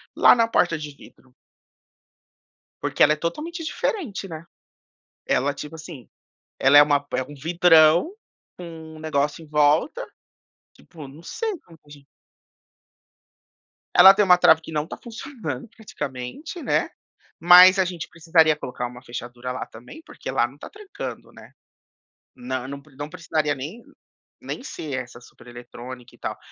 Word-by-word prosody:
lá - - +7
na 230 -1 +2
porta 175 -7 +1
de 150 -1 -7
vidro? 130 -2 -19 1.5
Porque - - +2
ela 150 - +5
é - - -2
totalmente 305 - -5
diferente, 285 - -3
né. 165 -1 -9 0.8
Ela, 140 +2 +1
tipo 150 +2 -9
assim, 155 -6 -11 0.5
ela 135 +2 +6
é 145 - +10
uma 145 -1 +2
por 145 - -4
é - - -2
um 145 - -12
vidrão, 165 - +4 0.4
com 160 -2 -10
um - - -12
negócio 150 0 -2
em - - -15
volta, 150 - +2 0.7
tipo, 155 -5 -13
não 145 +5 -14
sei 435 - -4
como 165 -2 -19
que 145 - -28
a - - -18
gen 145 -1 -15 1.9
Ela 195 0 +10
tem 210 0 +2
uma 180 -1 +6
trava 160 -2 +5
que 160 - -11
não 150 0 -2
tá - - -8
funcionando, 225 - -7
praticamente, 150 - -7
né, - - 0 0.5
mas 180 +2 +8
a 190 - +4
gente 175 -3 -5
precisaria 160 -1 +3
colocar 125 -3 -5
uma 125 +1 -11
fechadura 120 0 -7
lá 130 - -5
também, 125 - -13
porque - - -8
lá - - +1
não - - -17
tá - - -10
trancando, 420 -2 -9
né. - - -16 0.8
Não, 130 - -5
nã 140 +1 -7 0.2
não 145 +1 -6
precisaria 160 -4 -1
nem 155 - -8 0.6
nem 250 - -6
ser 150 - -6
essa 120 0 -14
supereletrônica 120 +1 -12
e - - -24
tal, - - -5
155 Hz, 155 wpm, -23 LUFS, 140-180 Hz, 1.9 s, é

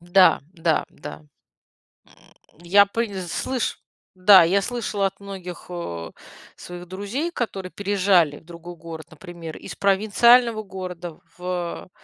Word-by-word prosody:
Да 175 +2 +5
да 165 -3 +1
да. 75 +1 -10 0.8
М, - - -24 0.5
я 200 +4 +6
пыль 205 -2 -3
слышу. 255 +7 -2 0.4
Да, 185 0 +8
я 190 +4 +3
слышала 215 -3 -1
от 190 - -10
многих, 190 -3 -8
а, 85 - -5 0.4
своих 175 0 -9
друзей, 205 - -3
которые 195 - -4
переезжали 190 -6 +2
в - - -26
другой 170 +1 -10
город, 160 -1 -9
например, 165 0 -9
из - - -9
провинциального 215 +3 +4
города 180 -4 -7 0.2
в, 180 0 -4
185 Hz, 125 wpm, -23 LUFS, 170-200 Hz, 0.8 s, Да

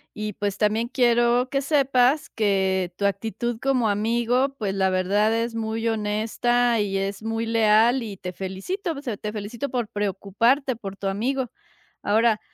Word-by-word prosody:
y, 215 -1 -4
pues, 200 0 -3
también 220 +2 +1
quiero 240 0 +2
que 275 0 0
sepas, 275 -1 +2
que 190 -4 +1
tu 200 - -1
actitud 220 +3 -2
como 255 -5 +2
amigo, 235 +6 +1
pues, 200 -3 -2
la 190 -1 +2
verdad, 200 +4 +2
es 230 0 -1
muy 225 0 -2
honesta 225 +2 +1
y 195 -1 0
es 195 +1 -3
muy 225 +1 -2
leal, 225 +2 +4
y 205 -4 -7
te 180 -2 -6
felicito, 260 - -4
o 280 - -8
sea, 225 -6 -3
te 210 - -5
felicito 220 +6 -5
por 240 -4 -2
preocuparte 210 +7 0
por 195 -3 -7
tu 195 - -4
amigo, 245 +5 -1 0.5
ahora, 220 +1 +3
225 Hz, 165 wpm, -24 LUFS, 205-245 Hz, 0.5 s, leal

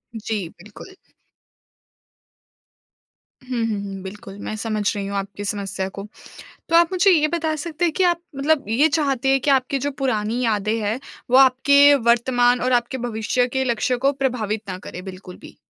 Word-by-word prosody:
जी, 215 -4 -3
बिल्कुल। 210 - -14 2.5
हुँ, 250 -3 -2
हुँ, 215 -2 -2
हुँ। 195 -1 -7
बिल्कुल, 195 0 -9
मैं 215 - -5
समझ 215 -2 -1
रही 200 -1 -3
हूँ 200 0 -3
आपकी 200 +1 -5
समस्या 195 -2 -3
को। 200 +1 -7 0.6
तो 330 - +3
आप 340 0 +5
मुझे 380 +2 +4
ये 305 -4 +4
बता 320 -1 -1
सकते 325 +2 -3
हैं 335 - +1
कि 380 - 0
आप 345 -1 +2 0.2
मतलब 285 +1 +1
ये 260 +8 +3
चाहते 280 -4 0
हैं 270 0 +3
कि 285 - 0
आपकी 270 0 +2
जो 285 +2 -2
पुरानी 230 -3 -1
यादें 215 -1 0
हैं, 215 +3 -1 0.3
वो 255 - +5
आपके 280 +2 +6 0.2
वर्तमान 245 +1 +3
और 255 +1 0
आपके 240 +1 0
भविष्य 225 +2 0
के 265 +1 -1
लक्ष्य 245 +1 0
को 280 - +4
प्रभावित 245 -6 -2
ना 185 -1 -5
करें 180 -1 -9
बिल्कुल 185 -1 -10
भी? - - -13
245 Hz, 175 wpm, -21 LUFS, 210-280 Hz, 2.5 s, आपके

